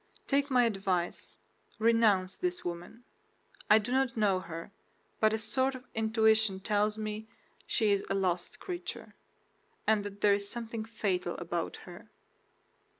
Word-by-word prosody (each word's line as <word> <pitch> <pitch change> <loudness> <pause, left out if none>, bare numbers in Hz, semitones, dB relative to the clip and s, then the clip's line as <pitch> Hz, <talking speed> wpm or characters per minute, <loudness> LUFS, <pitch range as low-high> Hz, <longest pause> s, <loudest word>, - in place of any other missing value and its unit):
Take 280 0 +1
my 250 -2 +4
advice, 195 -5 -2 0.4
renounce 220 -5 +3
this 360 -1 -2
woman. 175 +7 -6 0.7
I 215 - +8
do 220 +3 -2
not 260 -2 +1
know 200 -4 +3
her, 165 0 -8 0.5
but 215 0 +4
a 220 - +1
sort 260 +5 0
of 255 0 -10
intuition 220 -2 +3
tells 210 +2 +1
me 215 0 -4 0.4
she 215 -2 +2
is 200 -1 +2
a - - +1
lost 180 -2 -1
creature, 355 -2 -6 0.7
and 215 -2 +3
that 205 0 -8
there 205 -1 +5
is 200 0 -1
something 230 -1 -5
fatal 190 -6 -2
about 170 -1 -3
her." 180 +4 -12
215 Hz, 145 wpm, -31 LUFS, 190-230 Hz, 0.7 s, I